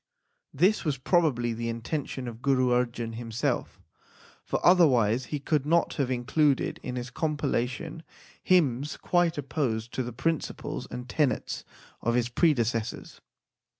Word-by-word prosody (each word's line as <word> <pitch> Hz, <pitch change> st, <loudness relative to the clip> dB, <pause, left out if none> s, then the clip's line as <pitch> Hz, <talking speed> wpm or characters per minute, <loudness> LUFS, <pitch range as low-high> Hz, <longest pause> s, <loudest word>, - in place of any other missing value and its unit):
This 185 Hz, +9 st, +2 dB
was 150 Hz, -5 st, 0 dB
probably 130 Hz, -5 st, +2 dB
the 115 Hz, +1 st, -3 dB
intention 125 Hz, +2 st, -4 dB
of 115 Hz, 0 st, -8 dB
Guru 130 Hz, -2 st, +2 dB
Arjan 120 Hz, -2 st, 0 dB
himself, 115 Hz, 0 st, -2 dB, 0.6 s
for -, -, -1 dB
otherwise 130 Hz, -, +5 dB
he 145 Hz, +4 st, -3 dB
could 145 Hz, 0 st, 0 dB
not 165 Hz, +3 st, +2 dB
have 140 Hz, -4 st, 0 dB
included 135 Hz, +3 st, +1 dB
in 125 Hz, -, -5 dB
his 125 Hz, 0 st, -5 dB
compilation 150 Hz, +1 st, -2 dB, 0.4 s
hymns 150 Hz, -6 st, +2 dB
quite 175 Hz, -2 st, +1 dB
opposed 125 Hz, -6 st, -2 dB
to -, -, -1 dB
the 125 Hz, -1 st, -4 dB
principles 160 Hz, +7 st, -3 dB
and 125 Hz, 0 st, -6 dB
tenets 145 Hz, -1 st, 0 dB, 0.4 s
of 120 Hz, +1 st, +1 dB
his 120 Hz, -1 st, +1 dB
predecessors. 120 Hz, -6 st, 0 dB
130 Hz, 130 wpm, -28 LUFS, 120-155 Hz, 0.6 s, otherwise